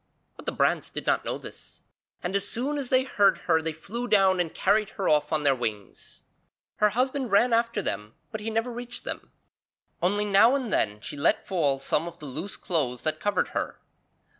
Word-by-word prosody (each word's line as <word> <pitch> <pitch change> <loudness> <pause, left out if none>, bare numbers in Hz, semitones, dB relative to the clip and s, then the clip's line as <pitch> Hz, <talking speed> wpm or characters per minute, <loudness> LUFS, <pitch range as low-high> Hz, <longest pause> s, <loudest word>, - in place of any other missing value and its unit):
But - - -13
the - - +2
brants - - +1
did - - -6
not - - +2
know - - -3
this, - - -12 0.4
and 180 +2 -2
as 200 0 +1
soon 280 +7 -1
as 265 -3 -3
they 260 0 +4
heard 205 -6 +3
her 160 -2 +3
they 160 0 -2
flew 230 +10 -5
down 195 -4 +4
and 170 -2 0
carried 210 +1 +2
her 195 - -1
off 150 -1 +2
on 155 -1 +1
their 140 -1 +4
wings. 110 -6 -6 0.5
Her 210 - +4
husband 255 +3 0
ran 230 +4 +4
after 230 -2 +1
them 105 -2 -4 0.2
but 220 - -5
he 220 - -3
never 225 +2 -1
reached 245 +1 -7
them, - - -6 0.7
only 205 +3 +2
now 210 +6 +5
and 255 -6 -2
then 105 0 +1
she - - -6
let 140 - +1
fall 150 -8 +1
some 150 +4 0
of 170 0 -8
the 150 - -10
loose 155 +8 -6
clothes 130 - -1
that 155 0 -1
covered 205 0 0
her. - - -4
195 Hz, 205 wpm, -27 LUFS, 155-230 Hz, 0.7 s, now